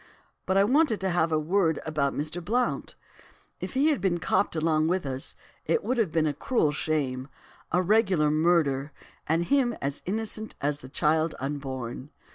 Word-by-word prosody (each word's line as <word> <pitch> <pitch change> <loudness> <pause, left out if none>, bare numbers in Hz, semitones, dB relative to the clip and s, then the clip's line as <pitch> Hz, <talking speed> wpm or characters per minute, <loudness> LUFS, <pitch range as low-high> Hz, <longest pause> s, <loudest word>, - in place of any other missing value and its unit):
But 190 - +2
I 195 - +6
wanted 260 0 +3
to 190 -1 0
have 165 -1 +1
a 155 - +3
word 160 +1 +1
about 150 -3 0
Mr. 155 +4 -3
Blount. 245 +6 -1 0.6
If - - -6
he 285 +4 +4
had 300 - +1
been 185 -3 +1
copped 180 +1 +1
along 155 -1 +2
with 180 -1 0
us, 130 0 -3 0.3
it 465 - +1
would 255 - -1
have 220 -7 +2
been 160 -1 +2
a 150 - 0
cruel 155 - +1
shame, 140 -4 -2 0.4
a 180 +1 +2
regular 185 -6 +3
murder, 155 -3 +2 0.4
and 165 +2 +2
him 250 +4 +2
as 140 +1 -3
innocent 220 +2 -3
as 145 0 -1
the 130 - -11
child 155 +3 +1
unborn. 135 -2 -5
160 Hz, 175 wpm, -27 LUFS, 145-200 Hz, 0.6 s, I